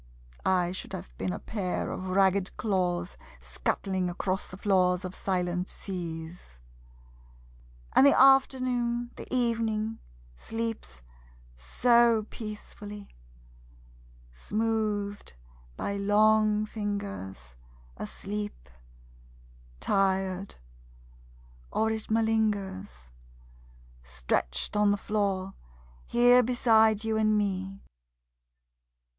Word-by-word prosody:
I 180 -2 +2
should 185 - -7
have - - -7
been 95 - -1
a - - -3
pair 190 -5 -3
of 185 - -5
ragged 190 0 +2
claws 180 -3 -1 0.2
Scuttling 190 -2 -2
across 185 +2 -2
the 185 - -9
floors 185 -2 +2
of 185 - -5
silent 180 -1 -1
seas.......... 165 - -6 1.3
And 275 - +7
the 280 - +5
afternoon, 255 -3 +3
the - - -8
evening, 225 -3 0 0.4
sleeps 225 - -5 0.5
so 235 - +3
peacefully! 210 -1 -8 1.2
Smoothed 210 - -2 0.4
by 200 - -2
long 215 +1 +3
fingers, 200 - -5 0.4
Asleep... 200 - -5 1.1
tired... 190 - 0 1.2
or 220 0 +1
it 220 -1 -4
malingers. 205 - -1 0.9
Stretched 60 - -2
on 210 0 +4
the 205 - +2
floor, 195 -2 -1 0.5
here 245 +1 +6
beside 220 -3 +3
you 220 0 0
and 215 -1 +3
me. 195 -1 -2
205 Hz, 85 wpm, -28 LUFS, 185-220 Hz, 1.3 s, And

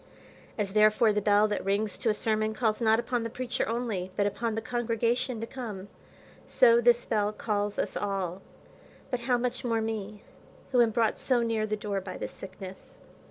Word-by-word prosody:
As 200 -3 -1
therefore 215 +1 +5
the 210 - 0
bell 205 +1 +4
that 210 - -2
rings 200 +2 0
to 230 - +1
a - - +3
sermon 215 0 0
calls 220 -1 0
not 220 -1 +4
upon 240 0 -1
the 230 - -3
preacher 250 +2 -2
only, 225 -6 -2
but 200 - +1
upon 225 +2 -1
the - - 0
congregation 240 +1 0
to 225 - -3
come, 215 -6 -7 0.6
so 235 -1 +5
this 240 0 +4
bell 210 -2 +1
calls 205 -1 -2
us - - -2
all; 195 -2 -2 0.7
but 250 - 0
how 245 +1 +1
much 250 +1 -2
more 230 -2 +1
me, 215 -2 -4 0.5
who 250 -2 +5
am 235 - +4
brought 225 0 +1
so 245 -3 +2
near 225 -2 0
the 215 0 -1
door 200 -2 -3
by 185 -1 -7
this - - -5
sickness. 190 0 -10
220 Hz, 190 wpm, -28 LUFS, 205-235 Hz, 0.7 s, therefore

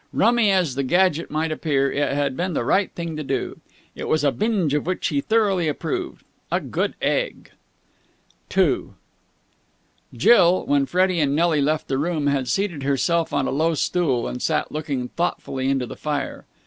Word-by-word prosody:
Rummy 230 0 +3
as 185 -8 +2
the 140 - -1
gadget 170 +3 +2
might 155 +1 -1
appear, 140 -4 0
it 145 0 0
had 140 -2 0
been 180 +3 -2
the 130 - -1
right 195 +9 +2
thing 170 -2 -4
to 155 - -4
do. - - -3 0.3
It - - -6
was 155 -1 +1
a 140 - +3
binge 200 -8 0
of 150 +2 -1
which 185 - -1
he 145 -4 0
thoroughly 200 -4 +1
approved. 360 - -4 0.3
A - - +2
good - - -2
egg! - - -1 1.1
II - - +2 1.2
Jill, 185 -6 +4
when 140 -1 +2
Freddie 185 -1 +2
and 145 -2 +1
Nelly 160 -2 +2
left 155 +2 0
the 135 0 -1
room, 155 -1 -1
had 140 -2 +1
seated 190 -5 -1
herself 160 +5 +1
on 140 -1 0
a - - -1
low 160 +4 +1
stool, 140 -6 0
and 125 - -5
sat 155 -2 0
looking 140 -5 -3
thoughtfully 135 -6 -2
into 135 -2 0
the - - -8
fire. 145 -3 -4
155 Hz, 175 wpm, -22 LUFS, 140-180 Hz, 1.2 s, Jill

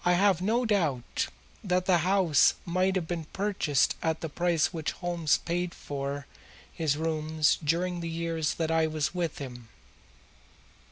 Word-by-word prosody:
I 175 - +4
have 190 -1 +3
no 230 +6 +1
doubt 160 - 0 0.4
that 180 -2 +1
the 180 -2 +4
house 180 -4 +4
might 185 +2 +1
have 175 -4 -1
been 165 -2 -3
purchased 190 -6 +1
at 160 -1 -1
the 160 - -3
price 170 +1 +1
which 160 -2 -2
Holmes 175 -4 +1
paid 175 0 -3
for 140 0 -4 0.5
his 155 -4 0
rooms 155 -1 +1
during 175 +4 0
the 170 -1 -4
years 165 -1 -1
that 165 -1 -1
I 160 -1 +3
was 155 0 -1
with 175 -4 -2
him. 120 -4 -8
165 Hz, 155 wpm, -28 LUFS, 155-180 Hz, 0.5 s, I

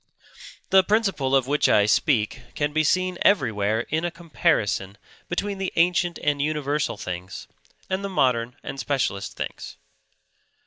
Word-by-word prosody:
The 190 0 +7
principle 190 -11 +1
of 135 -2 +3
which 145 +3 +2
I 100 - +5
speak 105 0 +1
can 145 0 -1
be 155 0 +2
seen 185 +3 +1
everywhere 110 - +2
in 155 +6 -2
a 175 - 0
comparison 125 - -1 0.3
between 195 +3 -2
the 195 - -2
ancient 175 0 +2
and 145 -1 +1
universal 150 -3 -1
things 90 -1 -6 0.4
and 190 +1 -2
the 200 - -3
modern 125 -8 +1
and 135 - -6
specialist 135 -9 -2
things. - - -6
145 Hz, 140 wpm, -24 LUFS, 115-175 Hz, 0.4 s, The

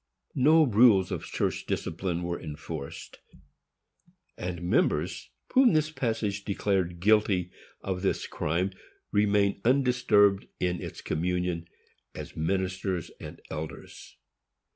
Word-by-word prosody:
No 155 +4 +5
rules 110 -5 +5
of - - -3
church - - -2
discipline 85 +1 -2
were 85 0 -3
enforced, 75 -1 -7 1.2
and 90 -1 -5
members 85 0 0 0.2
whom 255 -5 +6
this 155 0 +2
passage 110 -7 -2
declared 95 -4 -1
guilty 100 -2 +3 0.3
of 95 -1 -3
this 95 - 0
crime 85 +5 -1 0.4
remained 100 -1 +2
undisturbed 120 -6 +3
in 90 -1 -1
its - - -7
communion, 90 0 -2 0.5
as - - -8
ministers 95 +1 -2
and - - -10
elders. 80 0 -8
95 Hz, 105 wpm, -28 LUFS, 85-105 Hz, 1.2 s, whom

